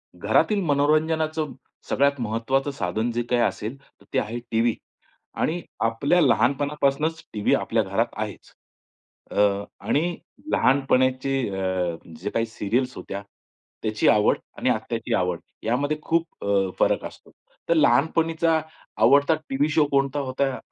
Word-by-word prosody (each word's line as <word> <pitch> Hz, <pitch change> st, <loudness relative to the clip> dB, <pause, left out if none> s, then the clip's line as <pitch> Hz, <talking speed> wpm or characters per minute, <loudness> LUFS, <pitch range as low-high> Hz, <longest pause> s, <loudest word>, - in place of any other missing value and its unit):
घरातील 210 Hz, -2 st, +2 dB
मनोरंजनाचं 155 Hz, 0 st, +1 dB, 0.4 s
सगळ्यात 140 Hz, 0 st, +2 dB
महत्त्वाचं 120 Hz, +5 st, 0 dB
साधन 110 Hz, 0 st, -2 dB
जे 120 Hz, +1 st, -1 dB
काही 120 Hz, -1 st, +2 dB
असेल, 115 Hz, +2 st, -1 dB
तर -, -, -26 dB
ते 130 Hz, -, +3 dB
आहे 115 Hz, +2 st, -3 dB
टीव्ही. 115 Hz, 0 st, +2 dB, 0.6 s
आणि 175 Hz, +3 st, -1 dB, 0.2 s
आपल्या 140 Hz, +10 st, +2 dB
लहानपणापासूनच 145 Hz, +3 st, +1 dB
टीव्ही 105 Hz, -2 st, +1 dB
आपल्या -, -, 0 dB
घरात -, -, 0 dB
आहेच. -, -, -6 dB, 0.8 s
अ, 100 Hz, -1 st, +2 dB, 0.2 s
आणि 170 Hz, +4 st, +1 dB, 0.3 s
लहानपणाचे 130 Hz, 0 st, +2 dB
अ, 95 Hz, -3 st, -1 dB, 0.2 s
जे 95 Hz, -, -3 dB
काही 115 Hz, +2 st, 0 dB
सीरियल्स 120 Hz, +3 st, -2 dB
होत्या, 100 Hz, -, -6 dB, 0.6 s
त्याची 110 Hz, -1 st, 0 dB
आवड 105 Hz, 0 st, +4 dB, 0.2 s
आणि -, -, 0 dB
आत्ताची -, -, -2 dB
आवड, 90 Hz, -2 st, 0 dB, 0.2 s
यामध्ये 140 Hz, +7 st, 0 dB
खूप 165 Hz, -8 st, -1 dB
अ, 100 Hz, -1 st, +2 dB
फरक -, -, +2 dB
असतो. -, -, -11 dB, 0.4 s
तर -, -, +6 dB
लहानपणीचा 160 Hz, +3 st, +3 dB, 0.4 s
आवडता 145 Hz, +4 st, +5 dB
टीव्ही 140 Hz, +3 st, +1 dB
शो 155 Hz, 0 st, +3 dB
कोणता 140 Hz, 0 st, +1 dB
होता, 135 Hz, 0 st, -1 dB
135 Hz, 125 wpm, -24 LUFS, 115-150 Hz, 0.8 s, तर